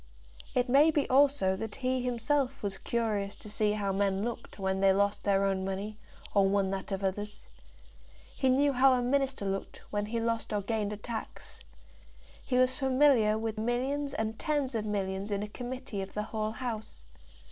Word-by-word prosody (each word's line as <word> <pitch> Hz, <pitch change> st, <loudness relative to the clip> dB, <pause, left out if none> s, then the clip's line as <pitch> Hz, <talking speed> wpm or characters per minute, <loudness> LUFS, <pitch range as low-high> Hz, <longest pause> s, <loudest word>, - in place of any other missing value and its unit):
It 250 Hz, 0 st, +2 dB
may 280 Hz, +5 st, +6 dB
be 295 Hz, -3 st, +1 dB
also 270 Hz, -8 st, +4 dB
that 215 Hz, +2 st, -5 dB
he 255 Hz, -1 st, 0 dB
himself 250 Hz, +2 st, 0 dB
was 195 Hz, -1 st, -3 dB
curious 210 Hz, -4 st, -1 dB
to 210 Hz, -, -11 dB
see 210 Hz, 0 st, +1 dB
how 200 Hz, -2 st, -1 dB
men 195 Hz, 0 st, +1 dB
looked 235 Hz, 0 st, -5 dB
when 190 Hz, -1 st, -1 dB
they 195 Hz, 0 st, +5 dB
lost 200 Hz, +1 st, +1 dB
their 200 Hz, -1 st, +3 dB
own 190 Hz, -1 st, 0 dB
money, 200 Hz, +3 st, -4 dB, 0.3 s
or 195 Hz, -1 st, +4 dB
won 195 Hz, -1 st, +1 dB
that 195 Hz, +1 st, -4 dB
of 195 Hz, 0 st, -2 dB
others. 205 Hz, +2 st, -3 dB, 0.9 s
He 265 Hz, -, +2 dB
knew 280 Hz, +2 st, +3 dB
how 265 Hz, +1 st, +5 dB
a 250 Hz, -1 st, +1 dB
Minister 270 Hz, -3 st, 0 dB
looked 195 Hz, 0 st, -4 dB
when 205 Hz, 0 st, -1 dB
he 230 Hz, +2 st, -2 dB
lost 230 Hz, 0 st, -1 dB
or 205 Hz, -1 st, 0 dB
gained 210 Hz, -1 st, -1 dB
a 210 Hz, -, -4 dB
tax. 225 Hz, +1 st, -7 dB, 0.8 s
He 255 Hz, -, -2 dB
was 255 Hz, +2 st, +3 dB
familiar 260 Hz, -5 st, +4 dB
with 220 Hz, 0 st, -3 dB
millions 270 Hz, +5 st, -1 dB
and 220 Hz, -2 st, -2 dB
tens 290 Hz, -4 st, 0 dB
of 220 Hz, -2 st, -1 dB
millions 195 Hz, -1 st, -2 dB
in 200 Hz, 0 st, -1 dB
a -, -, -4 dB
committee 245 Hz, -1 st, -5 dB
of 190 Hz, -, -8 dB
the 210 Hz, -, -1 dB
whole 215 Hz, 0 st, -3 dB
House. 225 Hz, -2 st, -5 dB
220 Hz, 185 wpm, -30 LUFS, 200-255 Hz, 0.9 s, may